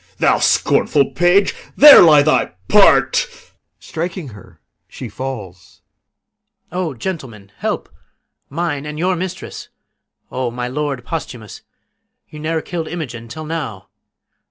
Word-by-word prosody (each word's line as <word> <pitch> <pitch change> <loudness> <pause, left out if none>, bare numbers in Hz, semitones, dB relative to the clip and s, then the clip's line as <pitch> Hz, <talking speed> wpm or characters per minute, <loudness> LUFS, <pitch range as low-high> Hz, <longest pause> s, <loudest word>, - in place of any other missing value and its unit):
Thou - - +2
scornful 140 -2 +2
page, 175 +3 +3 0.2
There 295 +1 +10
lies 150 -4 +6
thy 155 - +1
part. - - +4 0.5
[Strikes 170 -3 -6
her. 90 -5 -16 0.3
She 125 - -9
falls] 100 -7 -8 0.9
PISANIO. 180 -1 -2
O - - -7
gentlemen, 115 - -7
help! - - -3 0.6
Mine 150 -1 -3
and 150 0 -6
your 180 +3 0
mistress! 180 +1 -7 0.6
O, 130 -1 -2
my 125 +1 -5
lord 140 -2 -4
Posthumus! 125 - -7 0.7
You 150 - -11
ne'er 160 +1 -2
kill'd 165 -3 -5
Imogen 125 -9 -6
till 155 +7 -8
now. 150 -12 -6
150 Hz, 120 wpm, -18 LUFS, 120-165 Hz, 0.9 s, There